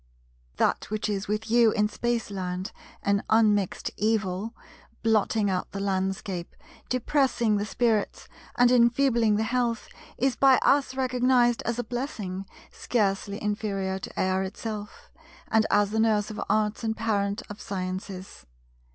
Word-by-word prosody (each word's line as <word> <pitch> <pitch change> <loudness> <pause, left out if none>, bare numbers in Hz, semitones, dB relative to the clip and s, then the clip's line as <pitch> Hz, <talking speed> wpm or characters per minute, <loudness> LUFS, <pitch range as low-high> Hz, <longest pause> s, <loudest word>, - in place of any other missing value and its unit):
That - - +1
which 215 +1 -2
is 205 -1 -2
with 215 +2 -2
you 235 -1 +6
in 210 0 +2
Spaceland 200 -4 -3 0.3
an 200 0 +1
unmixed 210 -4 +2
evil, 215 0 -1 0.5
blotting 220 -1 +2
out 185 -2 -2
the 195 - -4
landscape, 190 -2 -2 0.3
depressing 255 -4 +1
the 205 +1 -2
spirits, 225 -4 0 0.3
and 245 0 +5
enfeebling 235 -2 +4
the 215 - +1
health, 240 -1 -1 0.3
is 265 0 +1
by 270 -2 +5
us 275 -2 +3
recognized 250 -2 +2
as 235 0 -1
a 245 - -1
blessing 215 -6 -4 0.2
scarcely 200 -2 -1
inferior 200 -3 -2
to - - -7
air 185 0 +1
itself, 210 - -6 0.4
and 220 -1 +3
as 205 0 +3
the 220 - 0
Nurse 215 -1 +2
of 215 - -5
arts 215 +1 +1
and 220 -1 -1
Parent 205 -2 -1
of 205 0 -9
sciences. 185 - -6
215 Hz, 135 wpm, -26 LUFS, 200-235 Hz, 0.5 s, you